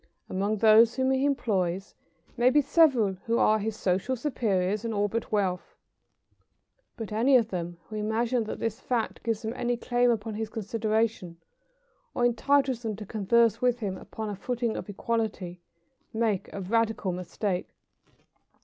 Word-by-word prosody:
Among 200 +3 -1
those 220 +2 +6
whom 260 0 +1
he 265 +1 +2
employs 195 -9 -1 0.4
may 245 0 +4
be 295 - +4
several 275 - +4
who 230 +1 +2
are 215 0 +4
his 215 +1 -3
social 195 +8 0
superiors 215 -7 -1
in 230 -1 -2
all 205 0 +1
but 225 +2 -4
wealth; 190 -4 -1 1.2
but 225 -2 -6
any 245 +5 +4
of 225 -3 0
them 175 -1 -4
who 215 - -6
imagine 225 +3 0
that - - -5
this 225 -1 -3
fact 240 -3 -2
gives 225 -1 -2
them 220 +1 -3
any 245 -1 -1
claim 245 +1 +1
upon 225 -1 -1
his 220 0 -4
consideration 220 -4 -1 0.8
or 240 - +2
entitles 260 +1 +2
them 220 -3 -3
to 210 +1 -8
converse 225 +3 +2
with 250 -1 +2
him 200 -4 -3
upon 220 +3 -7
a 205 - -4
footing 235 +3 -2
of - - -6
equality, 205 -4 -3 0.5
make 220 -4 0
a 200 - -6
radical 225 0 0
mistake. 180 +1 -3
220 Hz, 160 wpm, -27 LUFS, 205-240 Hz, 1.2 s, those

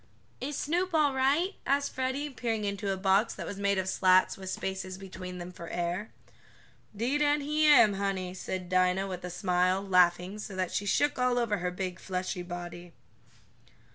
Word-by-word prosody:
"Is 280 +2 -4
Snoop 350 +3 -1
all 295 -3 +3
right?" 285 +9 +2
asked 280 +1 0
Freddie, 265 +3 -2
peering 225 -4 -2
into 200 0 -2
a 190 - -1
box 195 +3 +2
that - - -6
was 200 - -6
made 200 0 +1
of 190 0 -1
slats, 185 0 +4
with 190 -1 -7
spaces 190 0 -4
between 185 -1 -8
them 175 0 -7
for 170 -1 -9
air. 175 +5 -2 0.9
"'Deed 260 +7 0
an' 295 0 +3
he 305 +2 +2
am, 255 -8 +7
honey," 195 -2 -2
said 185 -1 -5
Dinah 185 +1 +2
with 185 -2 -6
a 180 - -4
smile, 180 0 +1
laughing 180 +1 +3
so 205 -2 -7
that 185 -1 -1
she 205 - -2
shook 290 +6 +2
all 250 -1 +2
over 220 -5 0
her 180 0 -1
big, 180 0 -4
fleshy 185 -1 -3
body. 175 -1 -7
195 Hz, 180 wpm, -29 LUFS, 180-255 Hz, 0.9 s, am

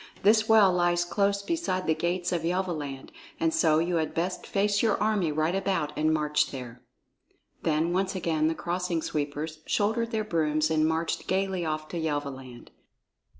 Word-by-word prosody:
This 215 +2 +4
well 210 -4 +6
lies 175 0 +2
close 200 +2 0
beside 315 - -1
the 160 - +3
gates 175 +2 -1
of 175 -2 0
Yelvaland, 165 -6 -3 0.3
and 165 0 +1
so 155 -2 +3
you 170 +2 +1
had 160 -1 -2
best 180 +2 -2
face 205 +1 +1
your 220 -3 +2
army 210 -6 +1
right 155 +3 0
about 190 -6 -1
and 155 +1 +2
march 150 -1 +1
there." 125 -3 -8 0.8
Then 160 +2 +1
once 190 +1 0
again 160 -4 0
the 160 - 0
Crossing 175 -1 -2
Sweepers 150 +1 -3
shouldered 225 +3 +1
their 220 -2 -1
brooms 155 -5 0
and 155 0 +3
marched 160 +1 -2
gayly 190 -2 0
off 155 -1 -3
to 175 - -4
Yelvaland. 140 -5 -4
170 Hz, 165 wpm, -27 LUFS, 155-190 Hz, 0.8 s, well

